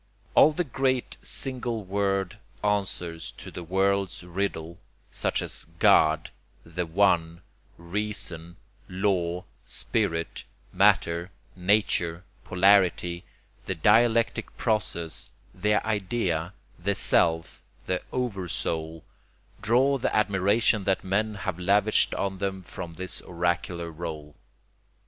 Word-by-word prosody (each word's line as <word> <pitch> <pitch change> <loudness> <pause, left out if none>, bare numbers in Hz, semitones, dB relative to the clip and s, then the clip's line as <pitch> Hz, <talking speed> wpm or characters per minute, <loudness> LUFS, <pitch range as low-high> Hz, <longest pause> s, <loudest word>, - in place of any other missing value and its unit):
All 155 - +7
the 175 +4 -1
great 130 -3 -1
single 120 -4 -2
word 95 0 -1 0.2
answers 95 -5 -2
to - - -10
the - - -7
world's 95 +2 0
riddle, 85 -2 -3 0.3
such - - 0
as - - -3
God, 80 -2 +4 0.3
the 85 +1 -3
One, 85 -2 +2 0.3
Reason, 85 -2 -4 0.3
Law, 90 -2 0 0.2
Spirit, 85 0 -1 0.3
Matter, 85 +2 +3 0.3
Nature, 90 -3 +1 0.2
Polarity, 90 -2 +3 0.4
the 95 - -1
Dialectic 115 +6 +3
Process, 95 -8 -2 0.2
the 105 0 +1
Idea, 95 -5 -1 0.3
the 100 +3 0
Self, 80 -2 +2 0.2
the 90 -1 -1
Oversoul, 85 -8 -2 0.6
draw 135 +5 +3
the - - 0
admiration 105 +1 +3
that 95 -1 +1
men 105 +3 0
have 95 -3 -4
lavished 100 +4 +3
on 95 -1 -2
them 95 -1 -3
from 85 -1 -8
this 95 +1 -4
oracular 85 -1 -2
role. 75 -2 -6
95 Hz, 105 wpm, -27 LUFS, 85-105 Hz, 0.6 s, All